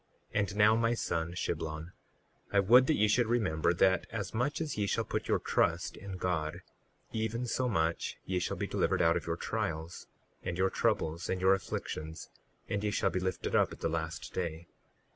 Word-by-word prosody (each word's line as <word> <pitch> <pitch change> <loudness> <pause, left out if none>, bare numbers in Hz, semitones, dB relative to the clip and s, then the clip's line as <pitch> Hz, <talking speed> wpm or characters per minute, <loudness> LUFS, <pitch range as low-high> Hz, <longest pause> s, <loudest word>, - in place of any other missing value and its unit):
38:5 - - +2
And 100 -1 -1
now 105 +1 +6
my 115 +1 +2
son, 85 -6 -2
Shiblon, 80 -1 -3 0.6
I 100 - +4
would 120 +6 +6
that 155 - +3
ye 105 - +3
should 115 +2 +3
remember, 90 -9 +2
that 95 +2 +3
as 100 -4 -4
much 125 +6 0
as 160 -2 -2
ye 105 -1 0
shall - - +1
put - - -3
your - - +3
trust 85 +1 0
in 95 -1 -7
God 85 -1 -2 0.5
even 110 +2 -2
so 125 +1 0
much 80 -5 0
ye 95 -1 0
shall 90 - -2
be - - -1
delivered - - +1
out - - +4
of - - -3
your - - -1
trials, 80 +2 -3 0.3
and 85 - -3
your 95 +1 +2
troubles, 80 +2 0
and 95 - 0
your 95 +1 +5
afflictions, 80 -4 -4 0.4
and 100 0 -2
ye 105 - +1
shall 95 -1 +1
be 95 - 0
lifted 95 -1 -2
up - - +4
at - - -10
the - - +1
last 80 0 -4
day. 85 -2 -3
95 Hz, 200 wpm, -32 LUFS, 85-105 Hz, 0.6 s, now